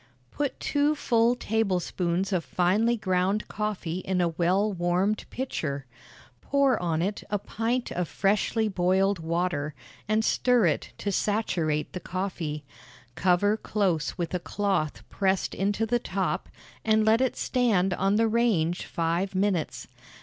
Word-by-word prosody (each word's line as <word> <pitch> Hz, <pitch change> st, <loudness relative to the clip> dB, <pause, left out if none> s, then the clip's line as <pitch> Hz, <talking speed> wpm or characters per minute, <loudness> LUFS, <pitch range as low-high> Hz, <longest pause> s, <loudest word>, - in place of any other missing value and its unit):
Put 285 Hz, -2 st, -2 dB
two 290 Hz, +1 st, +1 dB
full 235 Hz, -3 st, +2 dB
tablespoonfuls 190 Hz, -4 st, -1 dB
of 175 Hz, -3 st, +1 dB
finely 205 Hz, +9 st, +2 dB
ground 190 Hz, +1 st, 0 dB
coffee 205 Hz, -5 st, -3 dB
in 185 Hz, 0 st, -1 dB
a 175 Hz, -1 st, +2 dB
well 185 Hz, +5 st, +1 dB
warmed 180 Hz, +4 st, 0 dB
pitcher; 150 Hz, -, -3 dB, 0.6 s
pour 280 Hz, -2 st, +2 dB
on 165 Hz, -2 st, 0 dB
it 200 Hz, +2 st, -2 dB
a 205 Hz, -, +1 dB
pint 230 Hz, +5 st, -2 dB
of 180 Hz, -1 st, -2 dB
freshly 210 Hz, +6 st, +1 dB
boiled 190 Hz, 0 st, +2 dB
water, 165 Hz, -3 st, -1 dB, 0.3 s
and 215 Hz, +1 st, +2 dB
stir 250 Hz, -5 st, +3 dB
it 155 Hz, -4 st, 0 dB
to 205 Hz, -, -2 dB
saturate 170 Hz, -8 st, 0 dB
the 180 Hz, -, -4 dB
coffee: 175 Hz, -6 st, -4 dB, 0.5 s
cover 185 Hz, -, +3 dB
close 195 Hz, -8 st, -1 dB
with 170 Hz, -1 st, -3 dB
a 180 Hz, -, 0 dB
cloth 190 Hz, -5 st, -1 dB
pressed 190 Hz, -1 st, 0 dB
into 205 Hz, +3 st, 0 dB
the 240 Hz, +2 st, +1 dB
top, 195 Hz, -4 st, -2 dB, 0.3 s
and 220 Hz, -1 st, +3 dB
let 220 Hz, +3 st, +4 dB
it 260 Hz, -, 0 dB
stand 205 Hz, -8 st, +2 dB
on 195 Hz, +3 st, +1 dB
the 225 Hz, +1 st, +3 dB
range 215 Hz, -7 st, +1 dB
five 170 Hz, +4 st, -1 dB
minutes. 185 Hz, -4 st, 0 dB
195 Hz, 140 wpm, -27 LUFS, 175-220 Hz, 0.6 s, let